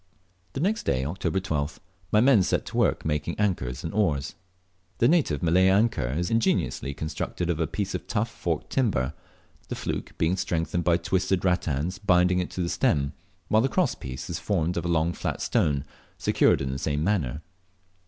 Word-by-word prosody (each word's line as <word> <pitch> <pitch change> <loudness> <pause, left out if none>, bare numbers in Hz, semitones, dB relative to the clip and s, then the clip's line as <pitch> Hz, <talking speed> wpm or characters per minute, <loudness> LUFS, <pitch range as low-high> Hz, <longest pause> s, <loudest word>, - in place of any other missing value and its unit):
The - - -3
next 205 +8 +1
day 65 -1 0
(October 95 +4 -1
12th), 75 -6 -2 0.3
my 105 - +5
men 125 -4 +6
set - - 0
to - - -6
work - - +2
making 75 +2 -1
anchors 70 -11 -1
and 80 - -4
oars. 80 -10 0 0.6
The 120 - +4
native 130 - +2
Malay 90 +3 +4
anchor 100 - +2
is 85 +8 -2
ingeniously 110 -10 0
constructed 80 +3 -3
of 80 - -3
a 80 - +1
piece 100 -2 -3
of - - -5
tough 115 +1 -1
forked 85 -6 -3
timber, 80 - +1 0.5
the - - -4
fluke - - -4
being 85 +4 +1
strengthened 85 -1 -1
by 85 0 +3
twisted 95 +1 0
rattans 90 0 0
binding 90 -3 +3
it 90 - -2
to 90 - -3
the - - -1
stem, 70 -2 +1 0.3
while 110 +3 +4
the 135 - +1
cross 170 -8 +1
piece 65 -1 -7
is 85 -1 -4
formed 85 -1 0
of 85 - -2
a - - 0
long 85 0 +1
flat - - -3
stone, 70 -1 +1 0.3
secured - - +3
in 65 -1 -2
the 65 - -4
same 75 +1 -1
manner. 80 -7 0
85 Hz, 185 wpm, -26 LUFS, 75-100 Hz, 0.6 s, men